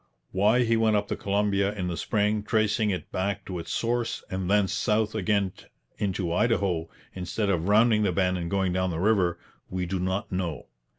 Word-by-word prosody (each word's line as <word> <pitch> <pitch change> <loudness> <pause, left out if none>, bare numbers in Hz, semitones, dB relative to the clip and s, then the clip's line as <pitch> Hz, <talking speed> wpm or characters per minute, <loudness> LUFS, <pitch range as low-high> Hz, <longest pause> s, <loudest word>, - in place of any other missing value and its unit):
Why 105 +6 +3
he 115 -1 +2
went 110 -1 +3
up 105 0 0
the - - -1
Columbia 100 0 0
in 90 -3 -3
the 90 - -2
spring, 105 +3 0
tracing 110 0 +1
it 95 -3 -3
back 100 +1 -2
to 90 -2 -5
its 85 - -6
source, 120 0 -1
and 95 -1 -2
thence 100 -1 +3
south 105 +1 +1
again 100 -2 +1 0.5
into 95 -4 -1
Idaho, 90 -6 +1 0.2
instead 95 +3 -2
of 85 -1 0
rounding 110 +1 +4
the 100 -3 +2
bend 90 0 +1
and 85 -1 -3
going 95 -1 0
down 95 0 0
the 80 - -3
river, 90 -2 +2 0.3
we 90 -1 -2
do 95 +1 -2
not 95 +2 -2
know. 90 -6 -3
100 Hz, 190 wpm, -27 LUFS, 90-105 Hz, 0.5 s, rounding